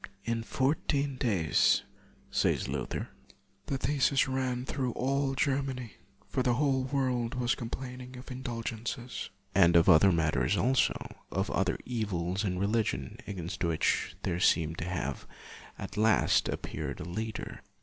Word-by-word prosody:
" 100 - -36
In 115 - -2
fourteen 140 +3 0
days," 95 - +3 0.5
says - - +1
Luther, - - -3 0.3
" - - -39
the 135 - -1
theses 140 +2 +2
ran 130 -1 -1
through 130 -3 -2
all 135 +1 0
Ger 135 +1 +2
many; 130 -4 -5 0.3
for - - -1
the 125 -1 +2
whole 135 -1 +2
world 130 -2 0
was 120 -1 +1
com 115 - -5
plaining 125 0 -7
of 130 +2 -10
indulgences." 120 -1 -4 0.2
And 85 -3 +5
of 85 - +6
other 95 +5 +7
matters 75 -7 +2
also; 130 +2 +3 0.4
of - - -1
other - - +1
evils 100 -5 -1
in 90 -3 -1
religion, 100 - -1
against 90 -4 -4
which 85 -2 +1
there 85 - -1
seemed 80 -2 +2
to - - -3
have 80 -7 -3 0.5
at - - -7
last 110 -1 +4
appeared - - -4
a - - -4
leader. 110 +6 -5
120 Hz, 150 wpm, -30 LUFS, 95-130 Hz, 0.5 s, other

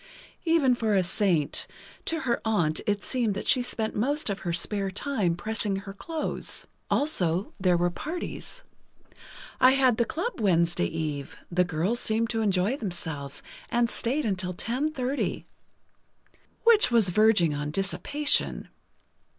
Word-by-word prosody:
Even 325 -6 +4
for 220 -3 0
a 190 - +3
saint; 175 -5 0 0.4
to 325 -1 -1
her 240 -4 0
aunt 175 -9 +1
it 205 -1 0
seemed 235 -6 0
that 200 - -4
she 255 - +4
spent 225 -2 -3
most 280 +3 +1
of 200 - -4
her 175 - -3
spare 195 +3 0
time 195 -4 -1
pressing 210 +2 -2
her 195 0 -6
clothes. 315 +9 -1 0.2
Also, 185 - +1
there 180 -2 +3
were 175 +1 +1
parties: 345 - -6 1.0
I 255 +1 +7
had 260 -4 +3
the 235 - +2
club 445 - -3
Wednesday 170 -4 +2
eve—the 160 +3 -2
girls 180 +8 0
seemed 225 0 0
to 225 -1 -1
enjoy 200 +4 +1
themselves 165 - -4 0.3
and 235 0 +1
stayed 275 +6 +1
until 185 -3 -2
10:30. 265 - -2 1.2
Which 460 -2 +6
was 230 -6 +3
verging 200 -5 +4
on 145 0 -3
dissipation. 195 - 0
210 Hz, 135 wpm, -27 LUFS, 175-255 Hz, 1.2 s, I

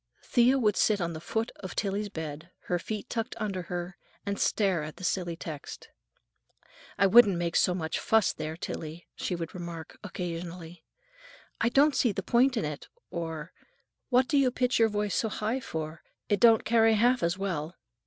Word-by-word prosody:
Thea 250 +2 +4
would 210 -6 +2
sit 210 -2 +3
on 170 -1 -2
the 160 - -7
foot 225 +6 -2
of 190 -3 -8
Tillie's 205 0 -1
bed, 160 -2 -6
her 175 - -1
feet 215 +6 -5
tucked 230 0 -3
under 200 -4 -2
her, 175 +2 -5 0.3
and 200 0 -2
stare 195 -6 +2
at 155 0 -6
the - - -12
silly 175 -2 -1
text. 155 -3 -8 1.1
"I 195 - +4
wouldn't 200 -2 +7
make 170 -1 -2
so 180 - +3
much 160 -3 -2
fuss, 220 -4 +3
there, 155 +1 -5
Tillie," 165 0 -6
she 180 - -2
would 165 -2 -5
remark 170 -3 -8
occasionally; 175 -3 -6 0.8
"I 235 - +2
don't 280 +4 +4
see 240 - +3
the - - -4
point 250 +1 +3
in 220 - 0
it"; 150 -1 -6 0.2
or, 165 -1 -5 0.6
"What 255 0 +4
do 285 -1 +3
you 265 -2 +4
pitch 250 -1 0
your 225 -1 +5
voice 210 -1 -1
so 220 - +1
high 220 +5 -2
for? 160 -7 -5 0.3
It 205 -2 +2
don't 230 -2 +6
carry 225 -1 +4
half 245 +3 +3
as 170 +2 0
well." 180 -4 -3
190 Hz, 185 wpm, -29 LUFS, 170-225 Hz, 1.1 s, wouldn't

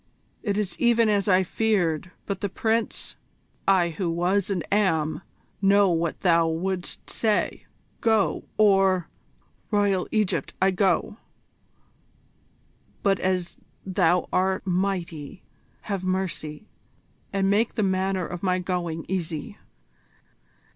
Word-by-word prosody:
It 205 -3 -1
is 210 -3 -2
even 235 -2 +4
as 205 0 +1
I 190 -1 +4
feared. 180 -5 0 0.2
But 195 -2 -4
the 200 - -1
Prince 225 +3 -2 0.2
" - - -40
"I 170 -1 +1
who 170 +2 -3
was 180 +4 +1
and 185 -5 -1
am, 165 -7 +1 0.4
know 200 -1 +5
what 165 0 -1
thou 170 -2 +4
wouldst 180 +3 -3
say. 215 -2 -1 0.3
Go, 220 -3 +2
or 195 -4 +4 0.3
" - - -39
"Royal 205 -3 +1
Egypt, 215 -3 0
I 190 +1 +4
go! 190 +2 +1 1.9
But 195 -1 +3
as 180 -2 -1 0.3
thou 180 -2 +2
art 190 +1 +1
mighty, 180 -3 -2 0.4
have 200 -3 -4
mercy, 185 -3 -2 0.7
and 195 -1 +1
make 210 +4 +2
the 215 - +1
manner 190 -1 0
of 175 0 -6
my 185 -1 +1
going 175 -3 -3
easy." 175 +1 -4
190 Hz, 120 wpm, -25 LUFS, 175-200 Hz, 1.9 s, know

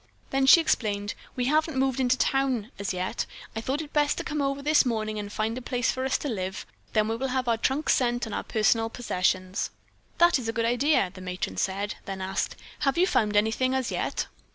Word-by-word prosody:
Then 270 0 +2
she 335 - +9
explained: 205 -9 0 0.2
"We 250 - -1
haven't 310 +1 +1
moved 265 -1 +1
into 255 0 +3
town 260 -5 +1
as 200 - -2
yet. 185 0 -2 0.3
I 225 - -2
thought 290 +5 -3
best 295 -1 +2
to - - -2
come 300 -1 -2
over 275 0 -1
this 305 +1 +5
morning 215 -4 -2
and 205 0 -6
find 220 +2 -1
a 255 - -5
place 245 0 0
for 260 0 -3
us 265 - +1
to - - -5
live; 190 -6 -3 0.3
then 215 -1 +3
we 225 - -1
will 265 +3 -2
have 255 -1 -1
our 230 - +3
trunks 265 +6 +1
sent 240 -1 +1
and 220 - -6
our - - -1
personal 225 +1 +1
possessions." 185 -4 -1 0.5
"That 345 -4 +5
is 230 -3 -4
a - - -1
good 230 0 0
idea," 245 -4 +2
the 185 - -10
matron 180 - -4
said, 195 - -1
then 195 -1 -5
asked: 190 +1 -2 0.2
"Have 275 +3 +1
you 360 - +5
found 210 - +1
anything 225 +5 +2
as 260 -2 -1
yet?" - - -1
240 Hz, 220 wpm, -27 LUFS, 205-270 Hz, 0.5 s, she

